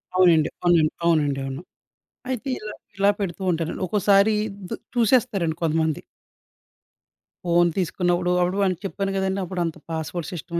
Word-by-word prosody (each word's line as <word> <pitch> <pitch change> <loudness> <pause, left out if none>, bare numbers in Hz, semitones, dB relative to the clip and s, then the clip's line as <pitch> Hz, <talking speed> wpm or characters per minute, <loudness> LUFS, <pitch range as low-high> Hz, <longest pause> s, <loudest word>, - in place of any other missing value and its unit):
అవునండి, 170 -4 +5
అవునండి. 170 -3 +4
అవునండి 150 -5 +2
అవును. 135 +4 -5 0.7
అయితే 260 +1 -3
ఇలా, 210 0 -7 0.2
ఇలా 200 +1 +4
పెడుతూ 190 -2 -4
ఉంటానండి 165 +2 -3
ఒక్కోసారి 200 +2 +4 0.3
దు - - -2 0.2
చూసేస్తారండి 215 -9 +2
కొంతమంది. 160 -1 +1 1.4
ఫోన్ 175 0 +4
తీసుకున్నప్పుడు 180 -1 0
అప్పుడు 180 +2 0
వానికి 185 -3 0
చెప్పాను 195 0 -2
గదండి. 190 0 0
అప్పుడంత 175 -2 -3
పాస్‌వర్డ్ 160 +1 -4
సిస్టమ్ 170 0 -4
175 Hz, 125 wpm, -23 LUFS, 165-195 Hz, 1.4 s, అవునండి